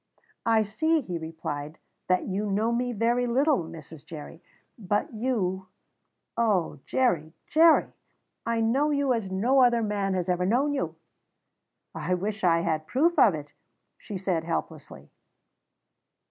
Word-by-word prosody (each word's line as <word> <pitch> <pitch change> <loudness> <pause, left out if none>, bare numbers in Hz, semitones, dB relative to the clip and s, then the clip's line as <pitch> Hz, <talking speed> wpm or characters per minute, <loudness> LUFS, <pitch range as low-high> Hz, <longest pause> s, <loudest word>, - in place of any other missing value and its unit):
"I 225 -1 +4
see," 315 +10 +1
he 180 -9 -5
replied, 160 -2 -6 0.3
"that 185 0 +2
you 205 +2 -2
know 215 +4 +1
me 245 +1 0
very 240 +2 +1
little, 275 +5 +3
Mrs. 160 -2 -11
Jerry; 160 +1 -10 0.3
but 205 +1 -2
you 200 -6 -1 0.7
oh, 200 - +1
Jerry, 165 -12 +1
Jerry! 325 +1 +4 0.5
I 230 0 0
know 265 +7 +2
you 280 -3 +2
as 225 -5 -2
no 235 +9 +3
other 240 -2 +4
man 200 -2 -1
has 180 -2 -1
ever 180 0 +1
known 270 +7 +2
you!" 275 - -2 1.0
"I 185 - -1
wish 205 +3 -4
I 170 -2 +4
had 155 -2 -1
proof 325 - +2
of 200 -7 +6
it," 145 -1 -9 0.5
she 205 - -6
said 180 -3 -1
helplessly. 155 - -5
205 Hz, 140 wpm, -27 LUFS, 170-245 Hz, 1.0 s, of